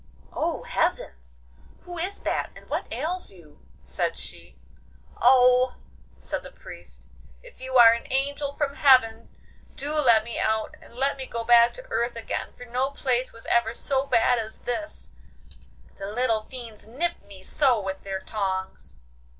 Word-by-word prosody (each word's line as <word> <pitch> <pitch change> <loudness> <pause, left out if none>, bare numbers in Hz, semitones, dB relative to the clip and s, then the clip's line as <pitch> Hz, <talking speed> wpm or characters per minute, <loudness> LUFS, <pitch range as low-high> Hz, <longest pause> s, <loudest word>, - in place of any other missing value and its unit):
'Oh, - - -2
heavens! 60 -2 -3 0.4
who 350 -1 -8
is 380 +4 -3
that, - - -1
and - - -14
what - - -3
ails 360 +3 -3
you?' 170 -6 -18 0.2
said - - -2
she. - - -7 0.6
'Oh,' 250 0 +5 0.4
said - - -4
the - - -11
Priest, 60 +1 -11 0.4
'if - - -15
you 260 0 0
are 230 -1 +9
an 235 - -6
angel 280 +1 -1
from 285 -2 -1
heaven 230 -5 +4 0.5
do 290 +2 -3
let 240 -8 +5
me 235 +1 -4
out 220 0 0
and - - -16
let 275 +2 0
me 265 -1 -4
go 230 0 -4
back 235 0 +6
to - - -9
earth 235 0 0
again, 230 - -4
for 245 - -10
no 250 +3 -1
place 255 -3 -1
was 230 - -14
ever 235 -1 +2
so 270 0 -1
bad 245 0 +3
as 220 -1 -6
this—the 310 +6 -5 1.0
little 220 0 0
fiends 235 -5 -9
nip 335 +10 -2
me 195 -2 -13
so 260 +1 +3
with 190 -1 -5
their 195 -1 -4
tongs. 190 - -4
240 Hz, 160 wpm, -25 LUFS, 215-270 Hz, 1.0 s, are